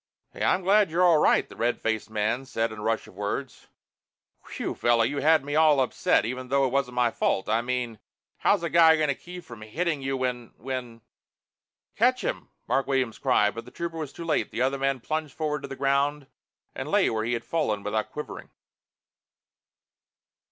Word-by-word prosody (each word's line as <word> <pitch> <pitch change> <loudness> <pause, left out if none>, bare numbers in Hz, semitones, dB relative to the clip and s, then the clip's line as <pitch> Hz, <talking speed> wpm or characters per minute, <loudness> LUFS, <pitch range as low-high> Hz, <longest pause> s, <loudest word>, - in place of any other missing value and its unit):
"Hey, - - -5
I'm 190 - +3
sure - - -14
glad 200 +1 +4
you're 170 +3 +2
all 170 -4 +6
right!" - - +3
the - - -13
red 120 +1 0
faced 110 -1 -2
man 110 +4 -1
said 115 -3 -1
in 110 - -8
a - - -7
rush 110 +1 -1
of - - -15
words. 105 +7 -5 0.8
"Whew, - - -4
fellow, 120 -1 +2
you 140 +5 -1
had 155 0 +4
me 145 +1 -3
all 155 -2 +5
upset, 130 - +2
even 130 +2 -4
though 135 +1 +2
it 130 - -1
wasn't 135 -2 0
my 120 -1 +2
fault. 95 - 0
I 115 +1 +2
mean, 120 -3 -3 0.4
how's - - +2
a 170 - -1
guy 160 -1 +6
gonna 150 -2 +1
keep 180 +5 -10
from 120 -2 -12
hitting 155 +7 -2
you 135 0 -2
when 125 -2 -3
when 125 -2 -6 0.5
" - - -57
"Catch - - +3
him!" - - -3 0.2
Mark 135 - +1
Williams 130 -5 0
cried, 105 0 +3
but 115 0 -7
the - - -11
Trooper 170 -1 -5
was 150 -3 -5
too 170 - -8
late. 160 - 0
The 125 - -1
other 135 +1 0
man 135 -2 0
plunged 155 +1 -3
forward 150 -2 -2
to 140 - -6
the 135 - -7
ground 140 +2 +1 0.5
and - - -5
lay - - +3
where 110 -1 -1
he 120 +2 -1
had 115 - -3
fallen 110 -11 -1
without 105 +1 -2
quivering. 150 - -7
135 Hz, 205 wpm, -26 LUFS, 115-150 Hz, 0.8 s, all